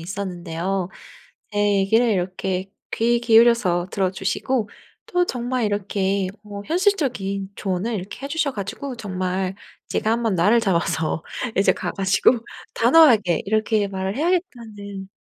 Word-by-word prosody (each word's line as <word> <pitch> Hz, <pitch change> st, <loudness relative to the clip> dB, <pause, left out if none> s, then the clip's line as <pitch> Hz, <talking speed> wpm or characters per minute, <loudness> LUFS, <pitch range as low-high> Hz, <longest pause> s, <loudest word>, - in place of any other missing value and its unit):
있었는데요. 180 Hz, 0 st, -3 dB, 0.6 s
제 205 Hz, -, -2 dB, 0.2 s
얘기를 225 Hz, +5 st, +3 dB
이렇게 185 Hz, -1 st, -2 dB, 0.2 s
귀 235 Hz, +1 st, +2 dB
기울여서 225 Hz, -7 st, +4 dB
들어주시고 195 Hz, +5 st, -1 dB, 0.4 s
또 355 Hz, -1 st, +1 dB
정말 245 Hz, -1 st, -2 dB
이렇게 200 Hz, -2 st, -1 dB, 0.2 s
어 205 Hz, -1 st, -7 dB
현실적인 270 Hz, -, 0 dB
조언을 195 Hz, +4 st, -2 dB
이렇게 200 Hz, +7 st, -6 dB
해 275 Hz, -, -4 dB
주셔 300 Hz, -2 st, 0 dB
가지고 250 Hz, +6 st, -5 dB
정말 185 Hz, -3 st, -3 dB, 0.3 s
제가 220 Hz, -, 0 dB
1 235 Hz, +1 st, 0 dB
번 220 Hz, -5 st, +1 dB
날을 205 Hz, +7 st, +4 dB
잡아서 170 Hz, -5 st, 0 dB, 0.3 s
이제 195 Hz, -, +4 dB
가 175 Hz, -, -4 dB
가지고 195 Hz, +6 st, +3 dB, 0.4 s
단호하게 230 Hz, -, +5 dB
이렇게 215 Hz, -1 st, +1 dB
말을 190 Hz, +2 st, -3 dB
해야겠다는 230 Hz, -, -3 dB
200 Hz, 295 characters per minute, -22 LUFS, 190-235 Hz, 0.6 s, 단호하게